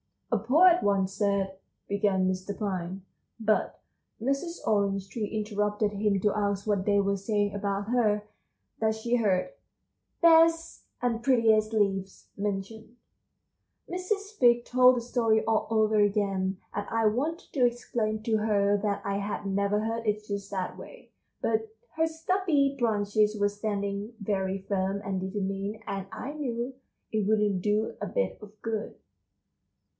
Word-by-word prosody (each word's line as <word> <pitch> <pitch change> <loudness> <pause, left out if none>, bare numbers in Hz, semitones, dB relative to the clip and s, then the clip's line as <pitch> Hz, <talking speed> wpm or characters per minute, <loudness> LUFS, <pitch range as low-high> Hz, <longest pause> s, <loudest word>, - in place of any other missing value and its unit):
"A 230 - +2
poet 335 - +5
once 195 -1 +1
said," 200 -1 0 0.3
began 200 -2 +1
Mr. 185 +2 -3
Pine. 190 -2 -3 0.4
But 215 -1 0 0.4
Mrs. 275 +8 -2
Orange 200 -2 +1
Tree 215 -1 -3
interrupted 210 0 -1
him 205 -1 +1
to 205 0 +2
ask 200 -1 -1
what 200 -3 0
they 205 -1 +3
were 200 0 +1
saying 205 0 0
about 200 0 -2
her; 215 -4 +2 0.6
that 220 0 +1
she 235 +2 0
heard 200 - +1 0.7
"best 330 -1 +4 0.2
and 235 -2 0
prettiest 225 -4 +3
leaves" 195 -3 -1
mentioned. 210 +3 -4 1.0
Mrs. 400 +3 -3
Fig 240 -1 +5
told 255 0 +6
the 240 - -1
story 230 -2 +1
all 225 -1 +1
over 220 -1 +3
again, 195 -2 +1 0.2
and 205 0 -3
I 225 0 +1
wanted 290 +11 -1
to 255 -4 +3
explain 220 -3 -1
to 225 -1 +1
her 205 -1 +2
that 200 -1 -1
I 200 0 -1
had 200 0 -4
never 200 +1 +1
heard 225 +1 -3
it 210 0 0
just 200 -1 -4
that 190 -2 -3
way; - - -12 0.3
but 220 0 0 0.3
her 320 0 +2
stubby 320 -4 +1
branches 210 -2 +1
were 205 0 +3
standing 205 +1 -3
very 195 -2 -1
firm 195 0 -1
and 195 -1 -1
determined, 195 +2 -3
and 195 0 -4
I 235 +5 -5
knew 250 -4 -3 0.4
it 215 -2 0
wouldn't 210 -3 +2
do 210 +3 0
a - - -2
bit - - -1
of 210 0 -13
good. 225 -1 -3
210 Hz, 145 wpm, -28 LUFS, 200-230 Hz, 1.0 s, told